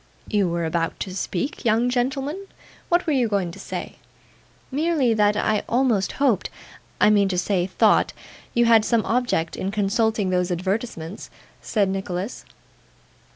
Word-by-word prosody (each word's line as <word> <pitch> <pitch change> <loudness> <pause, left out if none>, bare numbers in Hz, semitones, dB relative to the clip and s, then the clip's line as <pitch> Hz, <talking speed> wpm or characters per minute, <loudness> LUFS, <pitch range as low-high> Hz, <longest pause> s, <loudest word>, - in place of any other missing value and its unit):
'You 205 -4 +1
were 170 0 -1
about 165 0 -2
to 185 -2 -4
speak, 195 +7 -3
young 230 +1 +2
gentleman; 270 +9 -2 0.4
what 345 +1 +2
were 315 - +1
you 255 -4 +2
going 195 -5 -1
to - - -12
say?' - - -6 0.7
'Merely 290 -4 +2
that 210 -1 +2
I 210 0 +1
almost 235 -6 +1
hoped 255 -9 +1 0.5
I 210 - +5
mean 200 -2 +3
to 180 - -1
say, 180 -1 0
thought 185 - +3 0.4
you 240 0 +4
had 225 -2 +6
some 230 -1 +1
object 230 -9 0
in 190 - -3
consulting 210 0 0
those 180 0 +1
advertisements,' 185 0 -3 0.3
said 205 -3 +1
Nicholas. 190 +2 -4
210 Hz, 150 wpm, -23 LUFS, 185-245 Hz, 0.7 s, had